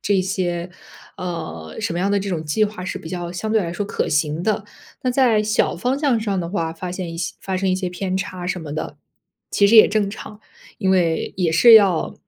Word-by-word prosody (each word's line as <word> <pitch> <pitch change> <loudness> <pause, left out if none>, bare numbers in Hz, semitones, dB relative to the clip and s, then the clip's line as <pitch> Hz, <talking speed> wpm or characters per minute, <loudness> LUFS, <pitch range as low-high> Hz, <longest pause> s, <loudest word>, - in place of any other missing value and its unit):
这 195 -2 +1
些， 180 -2 -2 0.5
呃， 160 - -6
什 - - -2
么 170 - -2
样 195 +3 0
的 205 - +2
这 200 0 -4
种 165 -4 -2
计 160 +8 +1
划 205 -3 -5
是 185 - -4
比 160 - -9
较 175 -1 -4
相 215 +5 -4
对 220 - +3
来 170 -4 -3
说 205 - -2
可 200 - -2
行 150 +1 0
的。 215 0 0 0.4
那 255 - +1
在 245 -4 +3
小 215 -3 +1
方 250 +9 -1
向 280 -6 +2
上 205 -4 -1
的 170 - -4
话， 165 -3 -2
发 175 +2 -6
现 180 -2 -5
一 165 - -7
些 - - -3
发 190 -1 -2
生 190 +1 0
一 185 - +2
些 185 -1 -3
偏 185 +1 -3
差 185 -2 -4
什 185 0 -2
么 155 -4 -7
的， - - -5 0.5
其 200 - +4
实 220 +3 +5
也 215 - +10
正 205 -1 0
常。 210 +1 -9 0.4
因 190 - +1
为 170 -3 +1
也 180 -3 +1
是 225 +9 +7
要 195 -6 +4
185 Hz, 255 characters per minute, -21 LUFS, 170-205 Hz, 0.5 s, 也